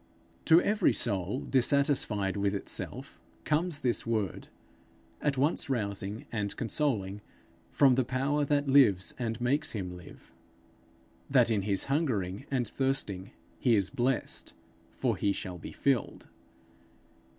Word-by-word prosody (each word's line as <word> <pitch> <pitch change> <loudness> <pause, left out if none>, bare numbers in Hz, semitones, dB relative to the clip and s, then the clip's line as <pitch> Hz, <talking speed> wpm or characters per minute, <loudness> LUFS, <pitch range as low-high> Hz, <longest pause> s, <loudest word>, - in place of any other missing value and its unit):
To 165 +1 +7
every 205 +1 +2
soul 100 +2 -1
dissatisfied 130 -7 +1
with 100 0 0
itself, 100 - -4 0.2
comes 155 0 0
this 120 -2 0
word, 110 -6 -2 0.7
at 145 -2 0
once 145 +2 +1
rousing 100 -3 -2
and 105 -3 -3
consoling, 110 -6 -1 0.5
from 135 -3 +5
the 130 +1 +2
Power 135 +4 0
that 145 0 +1
lives 110 -11 +4
and 115 -2 -2
makes 140 +6 0
him 90 -4 -4
live 90 - -14 1.0
that 125 -4 +4
in 105 -3 +2
his 100 0 0
hungering 125 - -1
and 125 -4 0
thirsting 105 -7 -2 0.3
he 120 -3 +3
is 100 -3 +1
blessed, 125 +1 -1 0.4
for - - -1
he 100 - +1
shall 90 -2 -5
be - - -8
filled. 135 -5 -1
120 Hz, 130 wpm, -30 LUFS, 100-140 Hz, 1.0 s, To